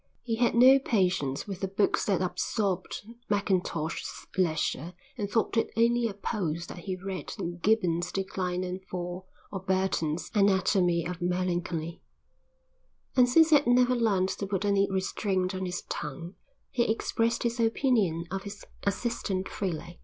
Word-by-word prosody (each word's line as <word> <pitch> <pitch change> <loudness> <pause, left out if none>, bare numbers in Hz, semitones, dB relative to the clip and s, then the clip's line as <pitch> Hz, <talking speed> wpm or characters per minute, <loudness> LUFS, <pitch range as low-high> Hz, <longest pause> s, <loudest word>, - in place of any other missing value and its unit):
He 230 -2 -1
had 240 0 +2
no 260 +3 +8
patience 180 - 0
with 195 -3 -6
the 195 - -1
books 195 +2 +1
that 190 -3 +1
absorbed 195 +1 -2 0.3
Mackintosh's 185 -5 -1
leisure 170 -1 0 0.2
and 205 -5 -3
thought 225 +1 0
it 225 - +2
only 235 +1 +3
a 205 - -6
pose 175 -5 -2
that 175 - -9
he 185 +1 -4
read 190 0 -5 0.3
Gibbon's 180 -5 +2
Decline 185 -2 -2
and 185 +1 -5
Fall 180 0 -5 0.2
or 195 - -3
Burton's 185 -4 -1
Anatomy 190 -4 +3
of 175 0 -5
Melancholy. 175 -2 -2 1.1
And 250 -2 +5
since 320 +4 +5
he - - +9
had 285 - -2
never 250 +1 +4
learned 200 -6 +2
to 200 - -3
put 195 0 -1
any 200 -1 +3
restraint 190 0 -1
on 185 0 -3
his 180 0 -4
tongue, 165 +5 -5 0.4
he 235 -3 +2
expressed 230 +1 0
his 235 0 -1
opinion 225 - +2
of 195 0 -2
his 200 +1 -9 0.2
assistant 200 -2 -1
freely. 170 -2 -4
190 Hz, 150 wpm, -28 LUFS, 180-220 Hz, 1.1 s, he